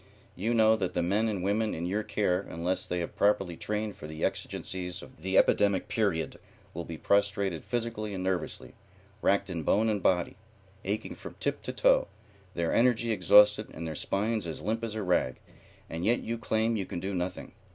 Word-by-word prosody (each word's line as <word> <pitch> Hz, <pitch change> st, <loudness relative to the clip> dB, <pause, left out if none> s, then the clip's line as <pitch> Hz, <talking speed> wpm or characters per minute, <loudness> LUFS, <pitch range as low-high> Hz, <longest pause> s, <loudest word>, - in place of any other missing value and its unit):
You 115 Hz, +6 st, 0 dB
know 110 Hz, 0 st, +5 dB
that 95 Hz, -4 st, -2 dB
the -, -, +1 dB
men 105 Hz, +6 st, +2 dB
and 100 Hz, -5 st, -2 dB
women 105 Hz, +3 st, +1 dB
in 85 Hz, -, -3 dB
your 100 Hz, +4 st, 0 dB
care, 100 Hz, -3 st, 0 dB
unless 85 Hz, +3 st, -1 dB
they 90 Hz, 0 st, -1 dB
have 85 Hz, -, -5 dB
properly 95 Hz, -4 st, +2 dB
trained 105 Hz, +2 st, -3 dB
for 75 Hz, -, -9 dB
the 80 Hz, 0 st, -2 dB
exigencies 90 Hz, -1 st, -4 dB
of -, -, -15 dB
the 95 Hz, +2 st, +1 dB
epidemic 100 Hz, -2 st, +3 dB
period, 100 Hz, -8 st, 0 dB, 0.3 s
will 85 Hz, +1 st, -5 dB
be 80 Hz, -, -6 dB
prostrated 100 Hz, -2 st, +1 dB
physically 115 Hz, -3 st, -3 dB
and 95 Hz, -, -3 dB
nervously, 95 Hz, -1 st, -3 dB, 0.5 s
racked 100 Hz, -, +2 dB
in 85 Hz, -4 st, -3 dB
bone 110 Hz, +8 st, +2 dB
and 105 Hz, -2 st, 0 dB
body, 90 Hz, -1 st, +1 dB, 0.5 s
aching 105 Hz, +3 st, -2 dB
from -, -, -10 dB
tip -, -, -1 dB
to -, -, -4 dB
toe, -, -, +3 dB, 0.5 s
their 85 Hz, -1 st, 0 dB
energy 120 Hz, -1 st, +3 dB
exhausted 105 Hz, 0 st, +5 dB
and 85 Hz, -, -5 dB
their 80 Hz, -, -3 dB
spines 105 Hz, +5 st, -1 dB
as 80 Hz, -, -5 dB
limp 115 Hz, +2 st, -1 dB
as 110 Hz, -2 st, -3 dB
a 110 Hz, -, -2 dB
rag, 90 Hz, -8 st, +1 dB, 0.5 s
and 80 Hz, +1 st, -5 dB
yet 120 Hz, +5 st, +3 dB
you 115 Hz, -, -3 dB
claim 110 Hz, +1 st, +1 dB
you 100 Hz, -4 st, -2 dB
can -, -, -4 dB
do 95 Hz, +3 st, -3 dB
nothing. 90 Hz, 0 st, -3 dB
100 Hz, 195 wpm, -29 LUFS, 90-110 Hz, 0.5 s, know